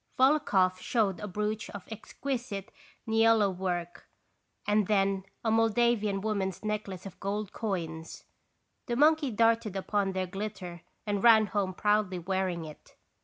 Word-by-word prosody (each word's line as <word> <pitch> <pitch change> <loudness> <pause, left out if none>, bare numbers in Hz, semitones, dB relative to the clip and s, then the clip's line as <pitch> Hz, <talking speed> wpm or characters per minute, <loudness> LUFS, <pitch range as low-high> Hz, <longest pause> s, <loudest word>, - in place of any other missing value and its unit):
Volokhoff 235 -10 +3
showed 205 -3 0
a 210 - -5
brooch 210 +2 -3
of 205 - -9
exquisite 230 -2 -5 0.4
niello 225 -3 +4
work, 175 -2 -4 0.6
and 210 -1 +2
then 195 -2 +1 0.2
a 220 - +2
Moldavian 225 -2 +2
woman's 200 -2 -2
necklace 205 -3 -3
of 195 - -10
gold 200 0 -3
coins. 165 -7 -4 0.6
The 240 - -1
monkey 300 +1 +4
darted 225 -2 +2
upon 195 0 0
their 185 0 -1
glitter 185 -2 -6 0.2
and 205 -1 -1
ran 225 -2 +7
home 195 -2 -2
proudly 210 -3 +1
wearing 180 -1 -2
it. 155 -1 -13
205 Hz, 130 wpm, -29 LUFS, 190-220 Hz, 0.6 s, ran